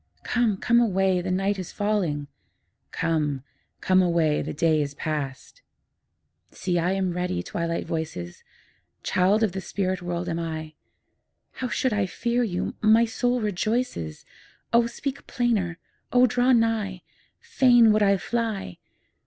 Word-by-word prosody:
Come, 235 -5 +1
come 235 +4 +3
away, 190 -5 +2
the 185 - -4
night 195 +2 0
is 185 - -6
falling; 195 -9 -1 0.6
'Come, 150 -5 -1 0.4
come 185 0 +4
away, 170 -4 +2
the - - -4
day 155 0 +2
is 140 -1 -4
past.' 150 - -5 0.9
See, 180 -2 -2
I 180 +3 +1
am 190 -2 0
ready, 180 - -2
Twilight 170 - -3
voices! 160 - -5 0.6
Child 195 +5 +2
of 215 - +2
the 190 +1 -5
spirit 185 0 -2
world 175 0 -3
am 170 -1 -2
I; 160 -1 -5 0.8
How 255 - -4
should 255 0 0
I 205 -2 +1
fear 235 +7 -1
you? 185 -7 -2
my 220 +2 +5
soul 245 +2 0
rejoices, 210 - -2 0.5
O 235 0 +5
speak 270 +3 -5
plainer! 210 -9 0 0.3
O 250 0 +6
draw 250 +1 +2
nigh! 225 -6 +1 0.4
Fain 245 - +5
would 215 - +2
I 200 -1 +4
fly! 220 - -3
190 Hz, 140 wpm, -25 LUFS, 170-230 Hz, 0.9 s, O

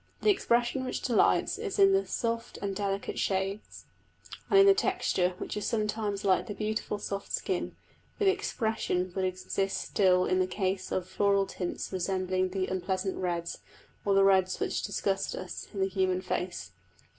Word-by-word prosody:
The 425 - +6
expression 245 -8 +1
which 255 - -3
delights 240 -4 +2
is 430 -3 -3
in 390 -1 +6
the 390 0 +2
soft 230 -1 -2
and 195 -1 -3
delicate 200 0 -2
shades; 195 +2 -2 0.6
and 400 - +5
in 395 - +8
the 395 - +8
texture 365 - +1
which - - -5
is 210 - -2
sometimes 210 -2 -1
like 190 +4 +3
the 205 - -5
beautiful 215 0 -2
soft 200 -1 -5
skin; - - -2 0.4
but 415 - 0
the 385 - +6
expression 220 - -1
would 190 -1 0
exist 185 +1 -2
still 185 -2 +3
in 185 - +1
the 185 - +2
case 185 0 -2
of 185 -1 -1
floral 200 +1 +2
tints 185 0 -5
resembling 185 0 0
the 185 0 -1
unpleasant 190 +1 -2
reds, 170 -2 -2 0.4
or 200 -1 +2
the 195 - +6
reds 190 -1 +3
which - - -1
disgust 195 -1 -1
us, 185 - -6
in 200 - -6
the 190 - +3
human 185 -1 0
face. 175 - -3
195 Hz, 170 wpm, -29 LUFS, 185-220 Hz, 0.6 s, in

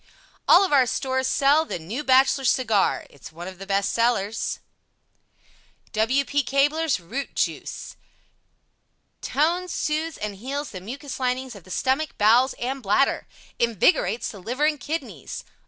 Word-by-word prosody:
All 395 - +7
of 365 - -2
our 260 -3 +5
stores 260 +1 -1
sell 285 +4 +4
THE 315 - -4
NEW 205 - -5
BACHELOR 270 0 +4
CIGAR 225 -5 +2
It's 140 - -12
one 170 +2 -8
of 185 -1 -9
the 195 - -8
best 195 0 0
sellers 230 -2 0 1.3
W. 255 +6 +1
P. 290 +1 +1
Cabler's 285 - +1
ROOT 240 +11 -6
JUICE - - -3 1.2
(Compound) 325 +6 +1
TONES, 365 -1 -8
SOOTHES 310 +1 -2
and 210 -1 -4
HEALS 280 +7 -4
the 185 - -7
Mucous 270 +8 -7
Linings 255 0 -1
of 195 - -13
the - - -16
Stomach, 270 - -1
Bowels 235 +5 +4
and 265 +2 -4
Bladder, 215 +6 +1 0.3
INVIGORATES 230 -1 +2
the 205 - -9
Liver 245 +10 -1
and 305 -1 +1
Kidneys. 315 +6 -5
260 Hz, 150 wpm, -24 LUFS, 210-285 Hz, 1.3 s, All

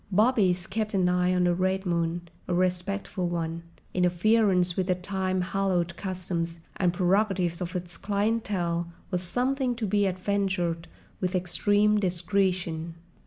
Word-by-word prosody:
Bobbies 195 -4 +3
kept 215 +1 -2
an 185 -2 +3
eye 180 0 +2
on 180 0 +2
the 175 0 +3
Red 190 +2 0
Moon, 170 0 -1 0.2
a 180 - 0
respectful 185 +1 -1
one: 165 -1 -2 0.3
interference 180 0 +3
with 190 -1 0
the 185 - +2
time 185 0 -1
hallowed 180 -2 0
customs 180 -3 -3 0.2
and 180 -2 +2
prerogatives 185 -1 +1
of 180 +1 -4
its 175 -1 -5
clientèle 200 -5 0 0.2
was 180 -1 0
something 250 +7 0
to 230 -2 -2
be 205 0 +2
adventured 185 -3 -1 0.3
with 185 0 -1
extreme 205 +4 +2
discretion. 180 -3 0
185 Hz, 135 wpm, -27 LUFS, 175-200 Hz, 0.3 s, Bobbies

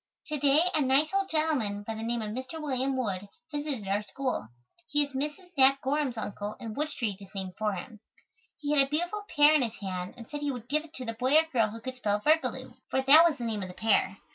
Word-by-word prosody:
To 300 -1 -2
day, 285 +2 +5
a 310 - +2
nice 280 +5 +3
old 390 0 +1
gentleman, 275 -11 0
by 225 - -3
the 220 - -6
name 230 0 -2
of 210 - -4
Mr. 260 +7 -6
William 270 -2 -1
Wood, 200 -5 -2 0.2
visited 290 -8 -3
our 200 +2 +1
school. 255 - -3 0.4
He 295 0 +2
is 280 - -15
Mrs. 300 +7 -4
Nat 270 +1 +6
Gorham's 275 -3 0
uncle, 205 -1 -4
and 225 -2 -6
Wood 300 +1 -1
Street 225 -9 -2
is 195 - -11
named 190 -1 -4
for 215 -1 -1
him. 215 +4 -8 0.6
He 290 -1 -3
had 280 - +6
a 270 - +1
beautiful 350 +7 -1
pear 295 +1 +7
in 305 - +4
his 230 -2 -1
hand 185 -2 -5
and 230 -2 -10
said 295 -1 -6
he 290 - -1
would 245 -3 -7
give 300 +3 +1
it 325 0 -15
to 255 - -6
the 230 - -3
boy 255 +5 +1
or 315 - +8
girl 225 -4 +4
who 225 +2 -8
could 255 +1 -6
spell 205 -4 +1
"virgaloo," 310 +8 +1 0.2
for 265 - +1
that 295 +5 +8
was 300 - -4
the 245 - -6
name 220 -3 -2
of 185 - -4
the 180 - -10
pear. 215 -3 +2
260 Hz, 250 wpm, -29 LUFS, 215-295 Hz, 0.6 s, or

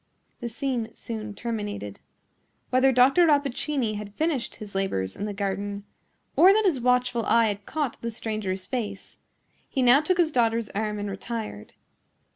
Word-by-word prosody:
The 240 - -4
scene 245 -2 -2
soon 215 -2 -6
terminated. 205 - -4 0.7
Whether 260 +1 +5
Dr. 265 +7 +5
Rappaccini 280 -5 +1
had 205 -1 -8
finished 290 -6 -1
his 210 -3 -10
labors 145 - -1
in 205 - -4
the 210 - -3
garden, 200 0 -3 0.5
or 370 +3 +8
that 435 0 +2
his 330 -9 +2
watchful 250 -1 +2
eye 230 -1 +4
had 200 0 -5
caught 295 -6 -2
the 235 - -2
stranger's 215 -4 -3
face, 205 -4 -5 0.5
he 265 - 0
now 250 +4 +7
took 360 +3 +1
his 335 -3 +3
daughter's 230 -3 +1
arm 210 0 -2
and 205 0 -3
retired. 210 - -6
230 Hz, 155 wpm, -26 LUFS, 205-260 Hz, 0.7 s, or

